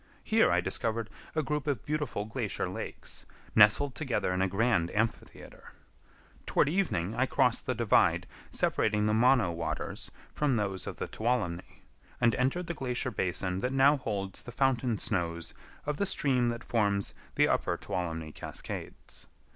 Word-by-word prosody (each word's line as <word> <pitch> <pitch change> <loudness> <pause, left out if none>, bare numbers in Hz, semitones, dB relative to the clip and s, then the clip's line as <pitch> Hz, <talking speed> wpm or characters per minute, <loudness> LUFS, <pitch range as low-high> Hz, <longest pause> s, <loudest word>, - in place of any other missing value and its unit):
Here - - +4
I - - +3
discovered 115 -1 -2 0.2
a 155 - +1
group 150 +1 -2
of 140 -3 -1
beautiful 150 -8 -2
glacier 110 - -2
lakes, - - -6 0.3
nestled 110 +6 +6
together 125 -11 -1
in 90 - 0
a 95 - +3
grand 100 -3 +2
amphitheater. 115 +2 -3 0.7
Toward - - +3
evening, 145 - 0
I 130 +3 +1
crossed 125 -2 +2
the 130 - 0
divide 115 -2 +3 0.2
separating 105 -1 +1
the 105 - +2
Mono 120 -4 +4
waters 85 -1 -4 0.2
from 145 -4 +1
those 100 -4 -2
of - - -4
the - - -3
Tuolumne, 110 -7 -1 0.6
and 120 -2 +4
entered 135 +8 0
the 170 - -3
glacier 130 -3 -2
basin 90 -1 -1
that 125 +5 -1
now 140 +2 +5
holds 100 -6 -3
the 120 - -9
fountain 125 -2 +1
snows 85 -6 -2 0.3
of 150 0 -2
the 200 - +1
stream 130 -8 +2
that 115 0 -4
forms 100 -4 0 0.2
the - - +5
upper - - +1
Tuolumne 80 -3 -4
cascades. - - -7
115 Hz, 155 wpm, -30 LUFS, 100-135 Hz, 0.7 s, nestled